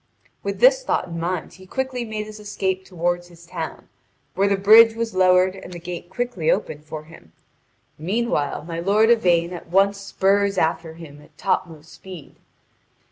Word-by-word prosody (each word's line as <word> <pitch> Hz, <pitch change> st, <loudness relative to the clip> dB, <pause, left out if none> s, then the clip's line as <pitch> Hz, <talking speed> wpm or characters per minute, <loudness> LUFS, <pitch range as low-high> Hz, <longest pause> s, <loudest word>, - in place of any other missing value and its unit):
With -, -, -4 dB
this -, -, +6 dB
thought 185 Hz, -, -1 dB
in 170 Hz, 0 st, -5 dB
mind 175 Hz, 0 st, -3 dB
he 185 Hz, +2 st, -15 dB
quickly 260 Hz, +2 st, -3 dB
made 215 Hz, -2 st, -5 dB
his 215 Hz, 0 st, -10 dB
escape 190 Hz, -2 st, -2 dB
toward 175 Hz, -1 st, -2 dB
his 170 Hz, -1 st, -17 dB
town, 170 Hz, -, -6 dB, 0.5 s
where 200 Hz, +1 st, +2 dB
the 200 Hz, -1 st, +2 dB
bridge 220 Hz, +3 st, +7 dB
was 230 Hz, -1 st, -3 dB
lowered 185 Hz, 0 st, +4 dB
and 190 Hz, -, -11 dB
the 175 Hz, -, -7 dB
gate 175 Hz, 0 st, -7 dB
quickly 190 Hz, -6 st, -2 dB
opened 150 Hz, 0 st, -1 dB
for 155 Hz, 0 st, -7 dB
him; 155 Hz, -, -17 dB, 0.7 s
meanwhile 175 Hz, -5 st, -1 dB
my 165 Hz, +1 st, -5 dB
lord 210 Hz, +6 st, +3 dB
Yvain 175 Hz, -6 st, +2 dB
at 175 Hz, -, -9 dB
once 195 Hz, +2 st, +3 dB
spurs 195 Hz, 0 st, +1 dB
after 160 Hz, -1 st, -1 dB
him 150 Hz, -3 st, -12 dB
at 150 Hz, 0 st, -21 dB
topmost 165 Hz, -5 st, -3 dB
speed. 185 Hz, -6 st, -12 dB
185 Hz, 170 wpm, -22 LUFS, 170-205 Hz, 0.7 s, bridge